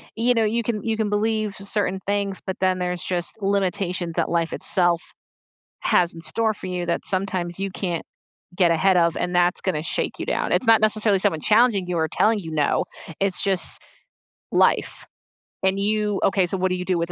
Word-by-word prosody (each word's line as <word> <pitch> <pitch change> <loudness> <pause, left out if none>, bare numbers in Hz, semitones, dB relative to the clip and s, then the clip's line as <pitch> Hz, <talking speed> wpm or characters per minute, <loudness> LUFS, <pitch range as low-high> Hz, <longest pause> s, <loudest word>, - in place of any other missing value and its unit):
you 235 +2 +2
know, 225 -2 +2
you 230 +2 0
can 215 -2 -2
you 225 -1 0
can 220 -2 0
believe 215 0 0
certain 195 -1 -2
things, 200 -1 -1
but 190 - -4
then 185 -1 +1
there's 180 -1 -2
just 180 +4 -3
limitations 190 -3 -1
that - - 0
life 170 -1 0
itself 175 -2 +1 0.8
has 175 -1 +2
in 165 - -9
store 220 +7 0
for - - -7
you 180 -1 -3
that 170 - -1
sometimes 185 -2 -2
you 195 0 -2
can't 175 -3 -3 0.5
get 175 -3 +4
ahead 185 +3 +3
of, 170 -1 +3
and 180 0 -2
that's 175 +1 +3
gonna 165 -6 -1
shake 165 - -2
you - - -4
down, - - -1
it's 255 - +1
not 225 -1 +6
necessarily 215 -2 +3
someone 185 -6 +1
challenging 215 -2 +3
you 180 -1 -2
or 160 0 +1
telling 220 0 +2
you 165 - -7
no, 150 -2 +1 0.4
it's 195 -2 0
just 190 -2 0 0.7
life. - - +2 0.6
And 190 +1 +2
you 210 0 0
okay, 195 -1 +3
so, 195 - -2
what 185 0 +1
do - - +1
you 180 - -4
do 185 -1 +1
with 170 +1 -2
190 Hz, 200 wpm, -23 LUFS, 175-210 Hz, 0.8 s, not